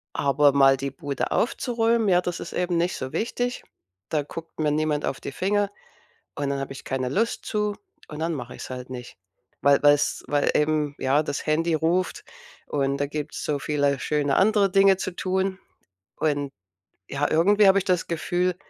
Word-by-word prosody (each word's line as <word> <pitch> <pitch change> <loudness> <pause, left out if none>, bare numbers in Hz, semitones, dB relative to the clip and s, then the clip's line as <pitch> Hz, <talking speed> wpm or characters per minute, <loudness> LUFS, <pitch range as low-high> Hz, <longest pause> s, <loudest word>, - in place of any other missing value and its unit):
Aber 140 +1 +3
mal 135 -1 +5
die 135 +1 -4
Bude 140 +1 -4
aufzuräumen, 230 -2 +1
ja, 180 -1 +5
das 175 -1 -4
ist - - -7
eben 180 -1 -1
nicht 175 +2 0
so 130 0 -5
wichtig. 245 +2 -2 0.5
Da 150 -2 0
guckt 160 +3 -10
mir 150 -1 +1
niemand 150 0 0
auf 135 - -2
die - - -6
Finger 200 +6 0 0.7
und 140 -1 -2
dann 140 0 -1
habe 135 0 -5
ich 135 - -8
keine 130 -1 -2
Lust 225 - -1
zu 210 -1 -1 0.3
und 150 - -8
dann 165 +1 -1
mache 125 -3 -6
ich's - - -8
halt 130 0 -7
nicht, 125 -1 -8 0.4
weil 140 0 +4
weil's 145 0 +3
weil 145 -1 +1
eben 150 -1 +1
ja 135 +3 +2
das 150 - -4
Handy 165 +2 +1
ruft 170 +4 0 0.4
und 140 -1 0
da 145 0 -1
gibt's 150 +1 -5
so 145 -2 -1
viele 140 -2 0
schöne 145 -2 0
andere 200 -1 +3
Dinge 195 0 +5
zu 185 - -3
tun. 190 0 -1 0.6
Und, 145 -3 -1 0.6
ja 140 +1 0
irgendwie 200 +6 +4
habe 195 +1 +6
ich 195 - +2
das 180 -2 +1
Gefühl 175 +2 0
155 Hz, 185 wpm, -25 LUFS, 140-185 Hz, 0.7 s, habe